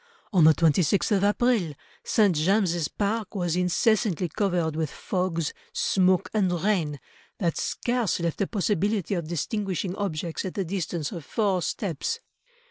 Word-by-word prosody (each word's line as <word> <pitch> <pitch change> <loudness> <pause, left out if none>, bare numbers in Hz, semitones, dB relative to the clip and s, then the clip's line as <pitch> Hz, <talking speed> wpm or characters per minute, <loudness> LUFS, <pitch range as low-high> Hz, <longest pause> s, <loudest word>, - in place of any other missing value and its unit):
On 180 -4 +5
the 160 -1 +7
26th 170 +5 +2
of 195 - +1
April, 205 - +2 0.3
St. 205 -6 +3
James's 175 -1 +2
Park 210 +2 -2
was 175 -3 0
incessantly 180 0 +1
covered 175 -4 0
with 160 -2 -1
fogs, 180 -3 -2 0.2
smoke, 185 -2 +2
and 200 -4 +2
rain, 165 -9 0 0.4
that 170 -4 0
scarce 240 -7 -1
left 170 +1 -2
a 200 - +1
possibility 205 -1 0
of 170 -4 -2
distinguishing 185 +2 -2
objects 170 -5 -3
at 185 - -5
the 195 - -1
distance 170 -4 -3
of 170 - -6
four 195 +1 0
steps." 190 - -2
185 Hz, 140 wpm, -26 LUFS, 165-205 Hz, 0.4 s, the